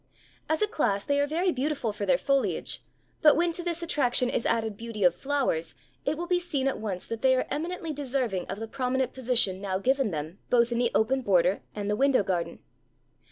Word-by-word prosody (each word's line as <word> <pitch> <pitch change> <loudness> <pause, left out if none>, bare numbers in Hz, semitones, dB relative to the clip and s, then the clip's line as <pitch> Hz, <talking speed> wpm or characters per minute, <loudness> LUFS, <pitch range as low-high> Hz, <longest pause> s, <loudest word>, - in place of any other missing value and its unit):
As 315 +6 +2
a - - +3
class 200 - 0
they 285 0 +1
are 285 - +2
very 345 +5 +1
beautiful 265 -5 -1
for 205 -1 -4
their 260 - +4
foliage, 275 0 0 0.4
but 300 - +7
when 345 +1 +2
to 340 - -5
this 345 -1 -2
attraction 250 -6 +2
is 235 - 0
added 225 -2 0
beauty 225 -1 -5
of 180 - +6
flowers, 270 - -1 0.3
it 295 +2 0
will 345 - -3
be 355 0 +2
seen 290 -7 -1
at 270 - -1
once 195 -4 -4
that 230 0 -5
they 260 -1 +5
are 255 - 0
eminently 330 +1 -3
deserving 255 -9 -2
of 195 - -5
the 225 - -5
prominent 260 +1 -1
position 235 -7 0
now 190 -2 -1
given 265 +4 +1
them 160 +2 -5
both 240 -1 +3
in 235 - 0
the 240 -1 +2
open 260 +5 +2
border 185 -4 +2
and 205 -1 -3
the 210 - +1
window 270 -1 +3
garden. 180 -3 -2
255 Hz, 210 wpm, -27 LUFS, 205-285 Hz, 0.4 s, but